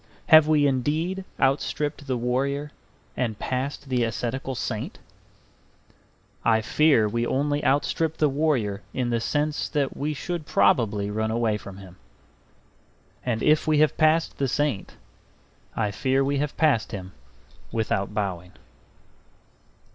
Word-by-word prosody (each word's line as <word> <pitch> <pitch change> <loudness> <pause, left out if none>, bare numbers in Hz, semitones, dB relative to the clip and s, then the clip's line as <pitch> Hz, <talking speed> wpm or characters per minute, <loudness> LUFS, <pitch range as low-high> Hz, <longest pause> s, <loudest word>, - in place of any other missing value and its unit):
Have 155 -2 +8
we 150 -2 +4
indeed 155 +8 0
outstripped 145 +2 0
the 130 -2 0
warrior 140 +4 -1 0.4
and 115 -4 -2
passed 135 +4 -3
the 125 -2 +1
ascetical 125 +4 -3
saint? - - -4 1.5
I 110 -1 +4
fear 140 -2 +3
we 115 +3 -1
only 145 +4 0
outstrip 155 +3 +1
the 150 - +3
warrior 135 -9 0
in 125 -2 -1
the 115 - +1
sense 150 +5 -1
that 145 -3 -1
we 150 +1 -2
should 170 +1 -4
probably 105 -3 +2
run 110 +1 -1
away 115 -1 +1
from 100 -2 -8
him. 95 -2 -13 1.3
And 115 -3 -1
if 155 +1 +3
we 155 -1 +3
have 155 0 +3
passed 160 +1 +2
the 135 - +1
saint, 140 -5 -1 0.8
I 105 -2 0
fear 130 +6 +1
we 140 0 0
have 145 0 -3
passed 150 -9 +2
him 95 -3 -6 0.6
without 105 -3 -1
bowing. 95 -4 -3
135 Hz, 130 wpm, -25 LUFS, 110-150 Hz, 1.5 s, Have